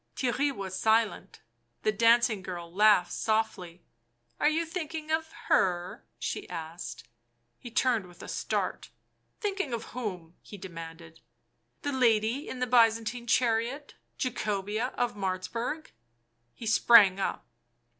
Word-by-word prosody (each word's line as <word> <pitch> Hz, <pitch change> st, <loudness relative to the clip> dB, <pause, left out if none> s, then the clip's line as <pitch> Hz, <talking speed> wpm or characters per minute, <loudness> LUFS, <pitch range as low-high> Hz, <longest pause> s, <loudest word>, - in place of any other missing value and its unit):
Theirry 270 Hz, +3 st, +1 dB
was 195 Hz, -7 st, -6 dB
silent. 220 Hz, -2 st, +1 dB, 0.4 s
The 215 Hz, -, +3 dB
dancing 230 Hz, -1 st, +4 dB
girl 175 Hz, -2 st, -7 dB
laughed 205 Hz, -3 st, +5 dB
softly. 200 Hz, -6 st, -1 dB, 0.3 s
" 120 Hz, 0 st, -44 dB
Are -, -, +4 dB
you 325 Hz, +2 st, 0 dB
thinking 320 Hz, -2 st, -5 dB
of 320 Hz, 0 st, 0 dB
— -, -, -14 dB
her 180 Hz, 0 st, +1 dB
?" -, -, -47 dB
she -, -, -4 dB
asked. 160 Hz, -8 st, -7 dB, 0.5 s
He 240 Hz, -, -9 dB
turned 235 Hz, -4 st, +1 dB
with 175 Hz, -1 st, -14 dB
a -, -, -8 dB
start. -, -, -2 dB, 0.2 s
" -, -, -45 dB
Thinking 390 Hz, -, -2 dB
of 230 Hz, -, -2 dB
whom?" 180 Hz, -9 st, -5 dB
he 205 Hz, -, -11 dB
demanded. 165 Hz, -3 st, -9 dB, 0.3 s
" 120 Hz, 0 st, -47 dB
The 285 Hz, -, -1 dB
lady 235 Hz, +1 st, +2 dB
in -, -, -5 dB
the 250 Hz, -, 0 dB
Byzantine 230 Hz, 0 st, +2 dB
chariot 240 Hz, +4 st, +1 dB
— -, -, -46 dB
Jacobea 215 Hz, -1 st, -2 dB
of 245 Hz, -, 0 dB
Martzburg." 205 Hz, +10 st, -3 dB, 0.6 s
He 230 Hz, -, -9 dB
sprang 215 Hz, -3 st, +6 dB
up. 195 Hz, -, -2 dB
220 Hz, 145 wpm, -29 LUFS, 180-250 Hz, 0.6 s, sprang